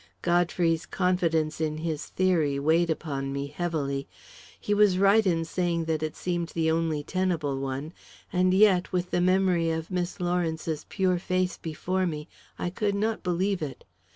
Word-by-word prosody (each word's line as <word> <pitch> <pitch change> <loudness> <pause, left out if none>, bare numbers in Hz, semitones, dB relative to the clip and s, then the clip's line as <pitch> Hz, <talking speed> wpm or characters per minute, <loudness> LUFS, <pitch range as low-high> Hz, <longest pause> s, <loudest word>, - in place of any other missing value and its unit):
Godfrey's 175 -1 +1
confidence 165 -4 0
in 155 -1 -1
his 160 -1 -3
theory 165 -7 +1
weighed 160 +4 +2
upon 140 -4 -2
me 140 0 -2
heavily. 140 -4 -2 0.5
He 205 - -1
was 205 -3 +4
right 200 +3 +5
in 165 -2 +1
saying 170 -1 -1
that 160 -1 -1
it 155 -1 -3
seemed 175 -2 -2
the 160 -1 0
only 160 -2 0
tenable 165 -7 -1
one, 135 +4 -4 0.4
and 185 0 +3
yet, 190 -2 +4
with 180 -1 -1
the 175 - +1
memory 185 -2 +3
of 160 +1 -3
Miss 180 +1 -2
Lawrence's 165 -3 -1
pure 185 -3 +1
face 185 0 0
before 180 +4 -2
me, 150 -2 -4 0.3
I 175 - -2
could 200 +1 -1
not 220 +2 -1
believe 185 +1 0
it. 145 -4 -5
170 Hz, 160 wpm, -27 LUFS, 155-185 Hz, 0.5 s, right